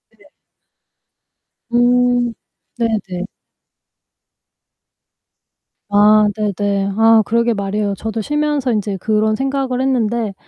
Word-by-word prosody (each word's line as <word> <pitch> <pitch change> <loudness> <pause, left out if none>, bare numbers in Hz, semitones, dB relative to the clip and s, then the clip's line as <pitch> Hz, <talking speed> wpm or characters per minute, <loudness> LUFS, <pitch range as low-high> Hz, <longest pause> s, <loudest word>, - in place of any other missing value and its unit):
네네. - - -23 1.5
음. 245 0 +2 0.4
네네. 205 -5 -2 2.6
아 210 +1 +5
네네. 200 -1 -1
아 225 0 +5
그러게 235 +2 +1
말이에요. 200 0 -2
저도 225 +3 -5
쉬면서 295 -1 -1
인제 205 -2 -2
그런 215 +2 0
생각을 270 -2 -2
했는데 235 -5 -1
220 Hz, 180 characters per minute, -17 LUFS, 205-245 Hz, 2.6 s, 아